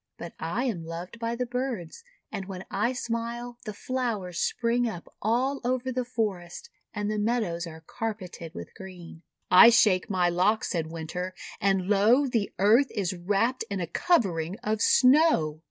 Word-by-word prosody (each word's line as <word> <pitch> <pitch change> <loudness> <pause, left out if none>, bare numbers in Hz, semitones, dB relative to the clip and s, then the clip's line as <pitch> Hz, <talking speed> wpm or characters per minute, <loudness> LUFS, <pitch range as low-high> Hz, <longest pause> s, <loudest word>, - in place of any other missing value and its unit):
But 170 - -8
I 175 +10 -2
am 215 -11 -2
loved 170 +7 -7
by 230 0 -2
the 250 +1 -2
birds, 245 - -4 0.3
and 195 - -4
when 190 -1 -7
I 210 +5 +1
smile 240 0 -4
the 215 - -5
flowers 220 -9 -3
spring 235 0 +1
up 175 -5 -8
all 255 +6 0
over 255 +1 -1
the 255 0 -1
forest, 220 - -4 0.2
and 210 -1 -3
the 215 - -1
meadows 205 -6 -1
are 160 0 -11
carpeted 195 -8 -6
with 85 - -8
green." 180 -4 -11 0.3
"I 185 +6 +10
shake 210 -6 +4
my 185 -3 +2
locks," 185 +5 +1
said 165 -4 -1
Winter, 175 +3 -5 0.2
"and, 195 -2 +1
lo, 215 +7 +4
the 230 -6 -1
Earth 225 +8 +4
is 195 -4 -2
wrapped 200 +8 0
in 200 -2 -3
a 175 - -1
covering 180 - +1
of 215 -1 -1
Snow!' 255 - +4
210 Hz, 165 wpm, -27 LUFS, 180-240 Hz, 0.3 s, I